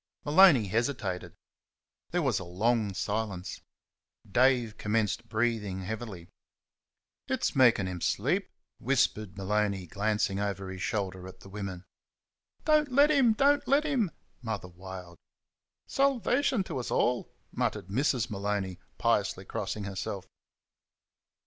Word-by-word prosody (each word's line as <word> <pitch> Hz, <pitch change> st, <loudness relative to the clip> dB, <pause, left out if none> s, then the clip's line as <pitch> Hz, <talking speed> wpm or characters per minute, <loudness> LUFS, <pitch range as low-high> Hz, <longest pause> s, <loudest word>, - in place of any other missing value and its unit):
Maloney 150 Hz, -, +7 dB
hesitated. 110 Hz, -3 st, -2 dB, 0.7 s
There 175 Hz, -1 st, 0 dB
was 130 Hz, -8 st, +1 dB
a -, -, -6 dB
long 105 Hz, +3 st, 0 dB
silence. 100 Hz, -1 st, -3 dB, 0.7 s
Dave 120 Hz, 0 st, +2 dB
commenced 105 Hz, 0 st, 0 dB
breathing 110 Hz, -4 st, -1 dB
heavily. 105 Hz, -4 st, -6 dB, 1.0 s
"It's -, -, -1 dB
maikin' 120 Hz, -7 st, +5 dB
'm 90 Hz, -2 st, -5 dB
slape," -, -, 0 dB, 0.3 s
whispered 110 Hz, -6 st, 0 dB
Maloney, 100 Hz, -1 st, 0 dB
glancing 100 Hz, +1 st, 0 dB
over 100 Hz, -2 st, -3 dB
his 95 Hz, 0 st, -7 dB
shoulder 95 Hz, -5 st, -2 dB
at 95 Hz, -, -12 dB
the 95 Hz, -, -12 dB
women. 95 Hz, -3 st, -6 dB, 0.8 s
"Don't 305 Hz, -2 st, +3 dB
let 285 Hz, +4 st, +5 dB
him! 265 Hz, -6 st, +5 dB
Don't 285 Hz, +5 st, +3 dB
let 280 Hz, +3 st, +4 dB
him!" 265 Hz, -, +1 dB, 0.3 s
Mother 110 Hz, -6 st, -4 dB
wailed. 90 Hz, -1 st, -10 dB, 0.7 s
"Salvation 270 Hz, -3 st, +2 dB
to 135 Hz, -, -4 dB
's -, -, -6 dB
all!" 125 Hz, 0 st, +1 dB, 0.2 s
muttered 90 Hz, -, -2 dB
Mrs. 125 Hz, +2 st, +1 dB
Maloney, 100 Hz, -2 st, -2 dB, 0.2 s
piously 100 Hz, -4 st, +1 dB
crossing 105 Hz, +2 st, -4 dB
herself. 100 Hz, -1 st, -4 dB
105 Hz, 115 wpm, -29 LUFS, 95-130 Hz, 1.0 s, Maloney